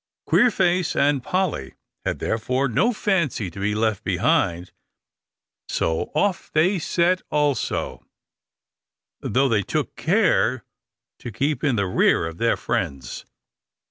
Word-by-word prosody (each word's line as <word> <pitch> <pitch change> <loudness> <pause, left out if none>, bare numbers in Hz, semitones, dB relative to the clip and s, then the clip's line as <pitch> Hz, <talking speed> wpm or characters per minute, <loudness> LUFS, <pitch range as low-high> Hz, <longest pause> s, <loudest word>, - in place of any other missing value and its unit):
Queerface 180 -7 +2
and 140 -1 +2
Polly 160 - -2 0.3
had, - - -2
therefore, 125 +5 -1
no 175 - +2
fancy 170 - -1
to 100 - -10
be 105 +1 -1
left 110 -2 0
behind, 85 +2 0 1.0
so 80 0 -1
off 200 -3 0
they 175 +5 +2
set 175 +3 +1
also, 150 -2 -1 1.2
though 135 +2 +1
they 110 -5 +2
took 150 +8 -3
care 160 - +1 0.5
to 120 - -7
keep 140 +6 -1
in 140 -5 +2
the 100 -2 0
rear 90 -2 +2
of 80 0 -7
their 115 0 +2
friends. 75 - -4
130 Hz, 120 wpm, -23 LUFS, 105-170 Hz, 1.2 s, Queerface